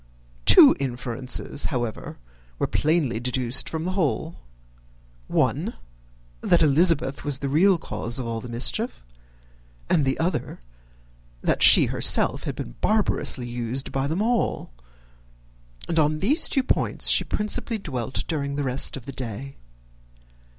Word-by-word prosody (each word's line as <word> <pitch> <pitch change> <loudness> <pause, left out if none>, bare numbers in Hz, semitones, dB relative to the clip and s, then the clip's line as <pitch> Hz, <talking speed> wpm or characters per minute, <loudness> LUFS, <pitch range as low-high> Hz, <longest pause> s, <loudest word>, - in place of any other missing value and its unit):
Two - - +8
inferences, 130 +1 -3
however, 120 -6 -4 0.4
were - - 0
plainly 150 -7 0
deduced 125 0 0
from 160 0 -4
the 185 - -2
whole: 165 -2 -2 0.9
one, - - -1 0.7
that 170 -1 +3
Elizabeth 150 -1 +2
was 145 -2 0
the 140 - -4
real 175 +7 +3
cause 115 -4 -4
of 130 - -3
all 115 -1 -4
the 125 - -9
mischief; 115 - -2 0.9
and 155 - +3
the 135 0 0
other, 170 +3 -3 0.8
that - - 0
she - - +9
herself - - +2
had - - -4
been - - -7
barbarously 205 - 0
used 120 +2 -4
by 135 0 -1
them 165 +8 -1
all; 235 - -1 1.2
and 165 - 0
on 155 0 +2
these 250 - 0
two 270 - +1
points - - -1
she - - +3
principally 215 +2 -2
dwelt 130 - -4
during 140 -4 -3
the 145 - -2
rest 130 +1 +1
of 125 - -11
the 140 - -7
day. 130 +3 -6
140 Hz, 135 wpm, -24 LUFS, 125-165 Hz, 1.2 s, she